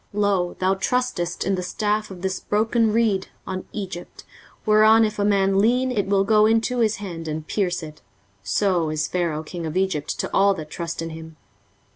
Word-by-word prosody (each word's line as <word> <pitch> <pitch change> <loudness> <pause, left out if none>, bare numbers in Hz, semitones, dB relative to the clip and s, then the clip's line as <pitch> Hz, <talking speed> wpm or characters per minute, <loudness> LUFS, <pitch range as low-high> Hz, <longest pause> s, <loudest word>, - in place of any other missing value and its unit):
23:036:006 210 - 0
Lo, 185 -3 +1
thou 185 +1 +2
trustest 195 -4 -1
in 195 - +1
the 185 - -1
staff 210 +4 -1
of 185 -2 -10
this 190 0 -1
broken 220 +1 +1
reed, 215 -4 +1 0.2
on 185 -1 -5
Egypt; 190 -4 -7 0.4
whereon 215 +1 +6
if 215 -1 -4
a - - +2
man 195 -1 +3
lean, 250 +5 +2
it 205 -6 -1
will 195 0 +3
go 215 +1 +4
into 225 +2 +1
his 220 -2 +2
hand, 170 -5 -7
and 155 0 -4
pierce 180 -2 -1
it: 155 -1 -10 0.4
so 175 - +1
is 155 0 -1
Pharaoh 170 -4 -1
king 170 0 -6
of 160 +3 -3
Egypt 190 -6 -1
to - - -1
all 200 0 +4
that 155 -2 -8
trust 165 -1 -4
in 165 - -5
him. 160 0 -10
195 Hz, 195 wpm, -23 LUFS, 170-215 Hz, 0.4 s, whereon